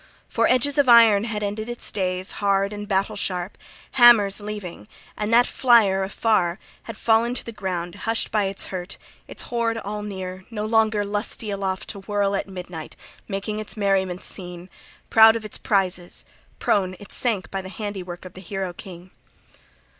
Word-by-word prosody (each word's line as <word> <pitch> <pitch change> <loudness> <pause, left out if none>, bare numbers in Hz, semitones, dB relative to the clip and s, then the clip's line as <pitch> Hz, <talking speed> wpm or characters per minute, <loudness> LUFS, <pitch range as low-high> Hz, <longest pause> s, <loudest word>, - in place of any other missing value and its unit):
For - - +1
edges 275 +3 +3
of 275 -3 +4
iron 225 -3 +7
had 210 -2 -3
ended 215 +3 -3
its 240 - -2
days, 185 -1 -1
hard 200 0 +2
and 205 0 -6
battle 195 +2 0
sharp, 185 -2 -3 0.4
hammers' 230 -6 +6
leaving; 205 - -7
{37a} - - -29 0.3
and 210 +1 -1
that 240 +1 +6
flier 225 -7 +4
afar 190 -2 +1 0.3
had 230 - -7
fallen 230 +2 +2
to 235 - -3
ground 180 -5 -4 0.2
hushed 225 - 0
by 210 -2 +2
its 195 0 -2
hurt, 180 0 -5 0.3
its - - -6
hoard 230 -1 -1
all 210 -1 -4
near, 190 -2 -6
no 215 -2 -4
longer 220 -2 +2
lusty 205 +1 -2
aloft 195 -1 -3
to 200 - -5
whirl 200 0 0
at 195 - -2
midnight, 180 -4 -8 0.3
making 210 +2 -3
its 215 +1 -5
merriment 190 -3 0
seen, 180 0 -6 0.4
proud 220 0 +8
of 225 -1 -4
its 210 - -5
prizes: 185 -3 0 0.3
prone 185 -2 +1
it 205 - -12
sank 220 -6 -1
by 195 - -2
the 185 - -9
handiwork 190 -4 -6
of 185 - -10
the 185 - -11
hero 190 -1 -4
king. 180 0 -11
200 Hz, 170 wpm, -23 LUFS, 185-220 Hz, 0.4 s, proud